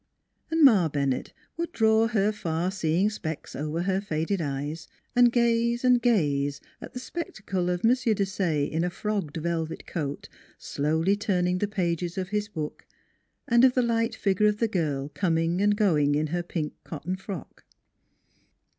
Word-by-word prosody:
And 325 -1 +2
Ma 200 - +6
Bennett 140 -3 -1 0.3
would 335 0 -3
draw 220 -2 +3
her 215 -2 +2
far 175 -3 -2
seeing 190 +2 +1
specs 160 -7 -6
over 155 +4 -2
her 190 +1 0
faded 170 0 -1
eyes 145 +2 -4 0.3
and 245 -1 +6
gaze 235 0 +2
and 250 -1 +5
gaze 145 - +1 0.2
at - - -9
the 250 - -5
spectacle 205 - -3
of 180 +3 -1
M. 230 - +6
Desaye 195 - +1
in 160 +3 -1
a 180 - 0
frogged 195 -4 -3
velvet 165 0 -3
coat, 145 -4 -4 0.3
slowly 160 +7 0
turning 180 -3 0
the 205 - 0
pages 175 -3 -2
of 185 -1 -3
his 210 0 -1
book, 155 -7 -6 0.6
and 235 +1 +4
of 255 -1 +6
the 250 - +3
light 230 0 0
figure 200 0 +2
of 210 0 +1
the 230 - +1
girl 150 -9 -1
coming 165 +2 0
and 205 0 +3
going 150 -9 +3
in 155 +1 +1
her 175 - +1
pink 165 -3 -4
cotton 165 +3 -4
frock. 190 -4 -8
185 Hz, 165 wpm, -27 LUFS, 160-215 Hz, 0.6 s, Ma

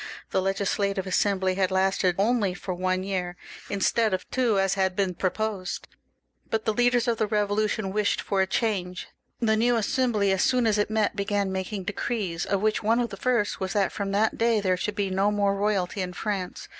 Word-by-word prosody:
The 190 - +2
Legislative 195 0 0
Assembly 190 0 +1
had 190 -1 +1
lasted 190 -1 +2
only 205 -2 +1
for 185 0 -4
one 185 +1 -1
year, 180 -2 -3 0.3
instead 205 +1 +2
of - - -8
two 240 -5 +2
as 195 0 +2
had 190 -1 0
been 190 -2 0
proposed; 195 +1 -2 0.6
but 220 -1 -1
the 220 - +1
leaders 245 +1 +2
of 230 -2 0
the 215 - +1
Eevolution 210 -1 0
wished 210 0 +1
for 195 -1 0
a 190 - +1
change. 190 -4 -2 0.3
The 220 -2 +2
new 240 +2 +3
Assembly, 220 -2 +1
as 190 -1 +1
soon 250 -2 +2
as 215 -2 +2
it 210 - +1
met, 215 -1 +1
began 200 -1 -1
making 190 +1 -3
decrees, 200 -3 -3
of 200 -1 0
which 215 0 +1
one 225 +2 +2
of 235 -2 -1
the - - -5
first 235 -1 0
was 185 -2 -3
that 200 -2 +1
from 200 -1 -3
that 210 +2 +1
day 230 -1 +3
there 185 -2 +1
should 205 +3 -3
be 200 -2 -1
no 195 +2 +2
more 200 -1 +1
royalty 200 -2 0
in 180 -1 -4
France. 195 -2 -4
200 Hz, 200 wpm, -26 LUFS, 190-215 Hz, 0.6 s, new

